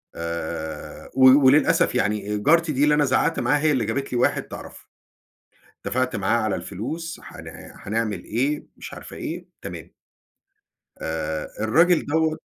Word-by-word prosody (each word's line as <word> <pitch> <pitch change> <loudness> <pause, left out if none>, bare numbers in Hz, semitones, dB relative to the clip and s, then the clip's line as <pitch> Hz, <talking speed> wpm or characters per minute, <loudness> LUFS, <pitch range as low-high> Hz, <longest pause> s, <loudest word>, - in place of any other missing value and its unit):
آآ، 85 -2 -5
و 130 - +5 0.2
وللأسف 150 +2 +4
يعني 105 -3 0
جارتي 165 +8 +3
دي 140 +1 +1
اللي 150 0 +4
أنا 150 -1 +3
زعقت 130 - +1
معاها 140 +5 +2
هي 155 0 +2
اللي 130 -5 +1
جابت 135 +6 -3
لي - - +1
واحد 120 - +2
تعرفه. - - -11 1.0
اتفقت 130 -1 -1
معاه 105 +3 +1
على 110 -3 0
الفلوس، 155 - -6
هن - - -11
هنعمل 110 0 -3
إيه، 135 +7 -1
مش - - -9
عارفة - - -10
إيه، - - -5 0.2
تمام. - - -8 1.1
آآ، 80 -1 -3 0.2
الراجل 165 +10 +4
دوّة 160 +1 +1
125 Hz, 145 wpm, -23 LUFS, 105-150 Hz, 1.1 s, و